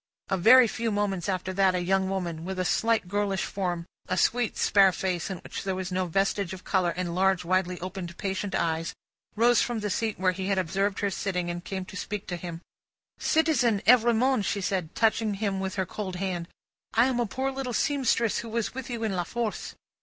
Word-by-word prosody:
A 190 - +1
very 240 +7 +7
few 230 +1 -2
moments 205 -3 -1
after 185 0 -2
that, 190 -1 +3
a 180 - 0
young 190 +1 +1
woman, 175 -4 -3
with 190 +2 -4
a 185 - 0
slight 225 0 +1
girlish 200 0 0
form, 175 -3 -3 0.2
a 185 - -1
sweet 240 +4 +1
spare 195 -2 +5
face 180 0 -2
in 190 - -4
which - - -6
there 190 -1 -1
was 185 0 -4
no 185 0 0
vestige 195 +1 0
of 185 - -9
colour, 185 -3 +1
and 180 -2 -2
large 190 0 +2
widely 180 0 0
opened 180 -2 -6
patient 195 0 -2
eyes, 165 0 -1 0.4
rose 235 +2 +4
from 240 -3 -1
the 210 -1 -2
seat 220 +2 -1
where 185 -1 +3
he 190 +1 -4
had 195 -1 +1
observed 195 +3 0
her 200 -1 0
sitting, 180 -3 -2
and 175 0 -6
came 190 -1 -4
to 190 - -11
speak 205 0 -4
to 175 - -4
him. 170 -1 -7 0.6
"Citizen 300 -9 +2
Evrémonde," 240 0 +4
she 200 - -1
said, 185 -4 -2
touching 220 -2 +2
him 195 -1 -1
with 190 0 -3
her 190 -1 0
cold 190 0 -5
hand. 180 -2 -3 0.5
"I 230 +2 +6
am 255 -2 0
a 240 - +1
poor 265 +5 -2
little 265 -2 -4
seamstress, 250 -4 +1
who 230 - -6
was 230 0 -2
with 265 0 -6
you 235 -2 -4
in 210 -4 -1
La 175 - 0
Force." 230 +4 -4
195 Hz, 215 wpm, -27 LUFS, 185-225 Hz, 0.6 s, very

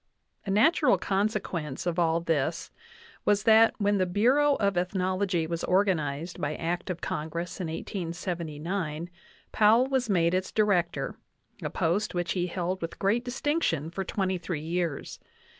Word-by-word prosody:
A - - -2
natural 250 - +4
consequence 190 -8 -2
of 175 0 -1
all 165 0 +2
this 165 0 -1 0.5
was 205 0 +2
that, 225 0 +6
when 205 -1 +1
the 185 - +2
Bureau 260 +10 +3
of 200 -4 0
Ethnology 185 -1 0
was 165 +1 -3
organized 175 -4 0
by 145 +1 -1
act 175 +3 -3
of 175 -2 -4
Congress 170 +4 -4
in 175 - -2
1879, 170 -1 -4 0.4
Pow 215 +1 +5
ell - - +3
was 260 -3 0
made 170 -3 +3
its 185 0 -1
Director, 200 -5 +1 0.4
a - - -2
post 185 +4 0
which 175 -1 -1
he 180 -1 0
held 180 +1 -3
with 165 - -5
great 210 +5 +1
dis 245 +1 -5
tinction 170 - 0
for 195 - -2
twenty 190 -1 -1
three 165 -3 -4
years. 170 -3 -3
180 Hz, 155 wpm, -28 LUFS, 165-205 Hz, 0.5 s, that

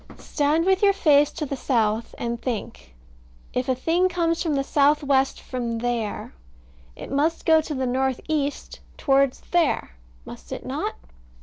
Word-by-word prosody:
Stand 300 +3 0
with 380 0 +3
your 400 -1 +5
face 295 -6 +4
to 315 - -3
the 275 - -4
south 230 -4 0
and 235 0 -3
think. 65 - -5 0.6
If 250 +1 -1
a 260 - +2
thing 335 +8 +1
comes 335 -2 0
from 315 -4 0
the 275 - +1
south 290 +2 +3
west 270 -1 +2
from 240 -3 -4
there, 230 - -3 0.6
it - - -9
must 305 +4 0
go 320 -1 +5
to 305 -1 -5
the 260 0 -1
north 260 0 0
east 290 -2 -2 0.2
towards 275 -1 +2
there. 340 - +1 0.3
Must - - -11
it - - -6
not? - - -3
275 Hz, 165 wpm, -24 LUFS, 245-315 Hz, 0.6 s, your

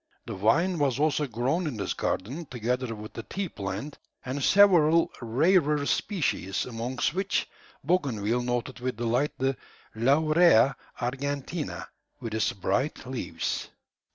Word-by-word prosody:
The - - -5
vine 160 - +2
was 135 -4 +1
also 150 -1 +1
grown 130 +9 -1
in 130 -7 -4
this 100 -2 -2
garden, 140 - -3
together 125 0 -2
with 105 0 -9
the - - -5
tea 195 - -4
plant, 100 +8 -5 0.3
and 130 +2 -3
several 170 -5 +5
rarer 150 +4 +2
species, 145 - -1
amongst 120 +3 -2
which 190 +2 0 0.4
Bougainville 125 - 0
noted 120 +1 -2
with 125 -2 -3
delight 120 +5 0
the 135 +1 0 0.4
"Laurea 140 +2 +4 0.2
argentea," 140 +5 -3 0.3
with 115 -4 -5
its 110 0 +1
bright 100 +11 -1
leaves. 130 -1 -3
130 Hz, 125 wpm, -27 LUFS, 115-155 Hz, 0.4 s, several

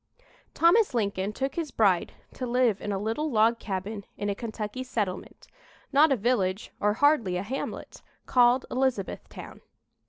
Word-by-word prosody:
Thomas 350 - +4
Lincoln 200 -3 -1
took 270 +5 -3
his 330 -1 -3
bride 195 -8 +2 0.2
to 255 - -5
live 240 -4 +2
in 205 - -3
a 195 - -1
little 225 +10 -2
log 230 -1 +3
cabin 200 +1 -4
in 205 0 -2
a - - 0
Kentucky 215 +2 -5
settlement 210 -7 -4 0.5
not 295 +2 +6
a - - +5
village 205 -3 0
or 210 0 +2
hardly 235 -8 +2
a 180 - -3
hamlet 260 +7 -6 0.2
called 245 +1 +4
Elizabethtown. 255 -7 -3
225 Hz, 150 wpm, -27 LUFS, 200-260 Hz, 0.5 s, not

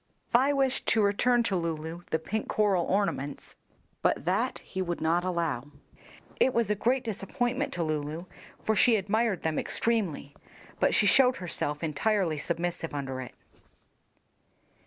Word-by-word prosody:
Vi 260 +4 +5
wished 270 -2 0
to 220 -1 +3
return 235 +4 +3
to 200 -4 0
Lulu 165 -1 -3
the - - +1
pink 215 +7 -4
coral 200 -5 +2
ornaments, 165 -8 -2 0.5
but - - +1
that - - +1
he 190 - -4
would 175 -2 -2
not 165 +2 +1
allow. 170 -8 -1 0.7
It 260 - +3
was 230 -3 +2
a - - +5
great 245 +5 +1
disappointment 245 +5 -2
to 175 - -1
Lulu, 155 +2 -3 0.4
for 220 - +1
she 235 +2 +5
admired 210 0 0
them 160 -1 0
extremely, 195 -11 -1 0.4
but - - +3
she 215 - +4
showed 250 +5 +5
herself 160 -3 -1
entirely 165 +1 0
submissive 170 -1 -3
under 135 -2 -4
it. 125 - -9
185 Hz, 145 wpm, -28 LUFS, 160-225 Hz, 0.7 s, Vi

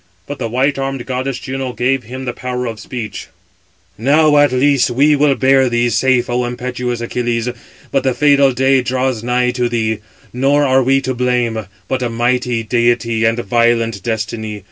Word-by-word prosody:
But 145 +5 -7
the 115 -3 -3
white 135 +4 0
armed 135 -2 -3
goddess 130 0 -3
Juno 130 -1 -5
gave 125 0 0
him 130 +3 -7
the 125 - -3
power 125 0 -4
of 115 -2 -5
speech: 110 -1 -6 0.7
"Now, 150 +5 +3
at 145 -2 +4
least, 135 +1 +2
we 145 +5 +3
will 145 -1 +3
bear 135 -1 +3
thee 120 0 +1
safe, 130 +1 +2
O 125 0 0
impetuous 125 0 -4
Achilles: 120 0 -2 0.4
but 135 - +1
the 130 -2 0
fatal 140 0 +4
day 130 +1 +2
draws 130 -2 -1
nigh 125 +1 +1
to 125 -1 -1
thee; 110 -2 -1 0.3
nor 140 +3 +2
are 130 0 +3
we 135 +2 +2
to 130 -1 -2
blame, 120 -4 -1 0.2
but 130 -1 -2
a 120 - -1
mighty 120 0 0
deity 120 0 +1
and 115 +1 +2
violent 115 -1 +1
destiny. 110 -1 -4
125 Hz, 175 wpm, -16 LUFS, 120-135 Hz, 0.7 s, at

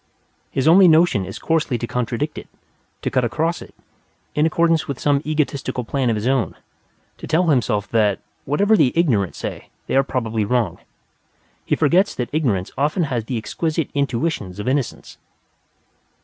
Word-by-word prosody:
His 135 +2 -1
only 185 +3 +7
notion 160 - +4
is 95 - -7
coarsely 160 -6 0
to 120 - -3
contradict 125 +5 -3
it, - - -12 0.6
to - - -1
cut 130 - +2
across 155 +9 -1
it, - - -13 0.6
in 150 +2 +2
accordance 165 0 +2
with 140 -3 -4
some 145 -1 +2
egotistical 145 -4 -2
plan 130 +1 -1
of 115 - +1
his 105 +1 -3
own; 130 -9 0 0.6
to - - -8
tell 170 +2 +2
himself 115 -7 +1
that, 105 -4 +2 0.3
whatever 200 +10 +3
the 145 -10 +4
ignorant 120 - +1
say, - - -6 0.2
they - - -2
are 135 - +6
probably 115 -5 -2
wrong. 105 -5 0 0.8
He - - 0
forgets 175 +6 +2
that 125 +1 -4
ignorance 115 - 0
often 150 +6 +1
has 115 -3 -1
the 125 0 -3
exquisite 160 +7 -2
intuitions 125 - -2
of 105 - -5
innocence. 135 -1 -2
135 Hz, 165 wpm, -21 LUFS, 115-160 Hz, 0.8 s, only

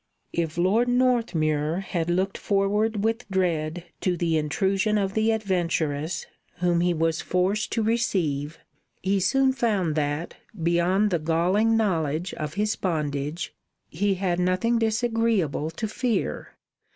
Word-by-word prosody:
If 165 -1 -2
Lord 200 +8 +3
Northmuir 185 -11 +1
had 175 -3 -2
looked 190 +3 0
forward 205 +1 0
with 225 0 -1
dread 175 -3 0 0.2
to 180 -2 0
the 165 -1 +1
intrusion 195 +7 +1
of 195 -1 0
the 220 +1 +2
adventuress 170 -6 -1 0.3
whom 175 -1 +1
he 175 0 +2
was 165 -1 0
forced 190 +4 0
to 225 - +1
receive, 170 -10 0 0.5
he 195 +1 +2
soon 265 +8 +3
found 210 -10 0
that, 150 +2 -2 0.3
beyond 175 +5 +2
the 175 - +1
galling 180 +8 +2
knowledge 170 -5 0
of 150 +1 -5
his 210 +1 0
bondage, 150 -2 -2 0.4
he 195 +4 0
had 180 -2 -1
nothing 185 +6 +1
disagreeable 225 - +1
to 165 +7 -4
fear. 235 +2 -2
185 Hz, 130 wpm, -25 LUFS, 165-215 Hz, 0.5 s, Lord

